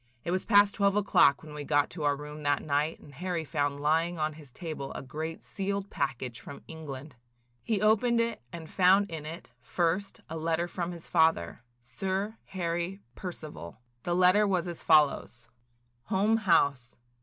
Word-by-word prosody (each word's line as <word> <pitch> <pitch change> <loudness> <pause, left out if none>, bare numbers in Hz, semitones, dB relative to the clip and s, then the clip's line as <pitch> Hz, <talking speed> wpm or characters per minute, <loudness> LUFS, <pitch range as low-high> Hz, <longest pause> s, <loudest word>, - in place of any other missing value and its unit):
It 170 - -2
was 185 +1 -1
past 205 -2 +5
twelve 200 -1 +2
o'clock 190 -9 +4
when 155 -1 -10
we 150 -1 -5
got 145 0 +2
to 165 - -7
our 145 0 +3
room 150 +1 -8
that 145 -1 +1
night 150 +2 0
and 145 - -15
Harry 175 +2 -3
found 145 0 -1
lying 165 +4 +1
on 155 0 -1
his 150 -3 -13
table 155 -1 -6
a - - -5
great 160 +4 -5
sealed 200 0 -3
package 130 -4 -3
from 140 - -10
England. 150 -3 -8 0.5
He 215 -3 -1
opened 230 +2 +4
it 230 0 0
and 165 -2 -8
found 190 +3 +4
in 155 -2 -5
it, 165 +3 -8
first, 180 +3 -1
a 165 - -5
letter 165 +2 0
from 175 0 -3
his 170 -2 -8
father, 160 - +2 0.2
Sir 190 - -3
Harry 175 +1 -3
Percival. 155 - -8 0.2
The 175 +5 -1
letter 185 +4 +5
was 185 -2 0
as 170 -1 -5
follows: 145 -7 +3 0.3
– 120 0 -43
"HOLME 210 +2 +3
HOUSE. 140 - +2
165 Hz, 175 wpm, -29 LUFS, 145-190 Hz, 0.5 s, past